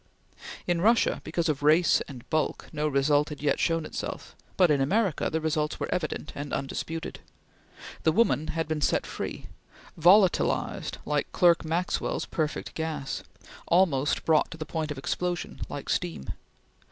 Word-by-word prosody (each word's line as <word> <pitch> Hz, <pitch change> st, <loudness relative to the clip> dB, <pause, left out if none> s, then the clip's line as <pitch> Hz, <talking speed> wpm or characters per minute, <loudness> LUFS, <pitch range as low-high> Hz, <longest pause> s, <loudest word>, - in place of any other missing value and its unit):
In 175 Hz, -2 st, 0 dB
Russia, 225 Hz, +3 st, +3 dB
because 165 Hz, +1 st, -1 dB
of 150 Hz, -3 st, -1 dB
race 155 Hz, +4 st, +4 dB
and 125 Hz, -4 st, -10 dB
bulk, 155 Hz, -1 st, -1 dB
no 150 Hz, +1 st, 0 dB
result 145 Hz, +1 st, +2 dB
had 150 Hz, -, -7 dB
yet 145 Hz, 0 st, +1 dB
shown 165 Hz, -1 st, +1 dB
itself, -, -, -6 dB, 0.2 s
but 180 Hz, -4 st, +5 dB
in 140 Hz, -2 st, +3 dB
America 190 Hz, +4 st, +1 dB
the 160 Hz, -, -1 dB
results 155 Hz, -1 st, -1 dB
were -, -, -2 dB
evident 155 Hz, -2 st, -3 dB
and 145 Hz, 0 st, -6 dB
undisputed. 165 Hz, +4 st, -4 dB, 0.8 s
The 160 Hz, -, +3 dB
woman 155 Hz, -5 st, +2 dB
had 160 Hz, 0 st, -2 dB
been 155 Hz, -1 st, -2 dB
set -, -, +2 dB
free -, -, -5 dB, 0.5 s
volatilized 180 Hz, +3 st, +3 dB
like 150 Hz, -1 st, -1 dB
Clerk 170 Hz, -1 st, +4 dB
Maxwell's 170 Hz, +3 st, -1 dB
perfect 155 Hz, -2 st, -3 dB
gas; 155 Hz, -4 st, -3 dB, 0.5 s
almost 160 Hz, -6 st, +2 dB
brought 160 Hz, -2 st, +3 dB
to 165 Hz, -, -9 dB
the 155 Hz, -, -5 dB
point 155 Hz, 0 st, -3 dB
of 150 Hz, -, -4 dB
explosion, 175 Hz, +5 st, -3 dB
like 145 Hz, -1 st, -6 dB
steam. 170 Hz, -, -2 dB
160 Hz, 155 wpm, -27 LUFS, 150-170 Hz, 0.8 s, but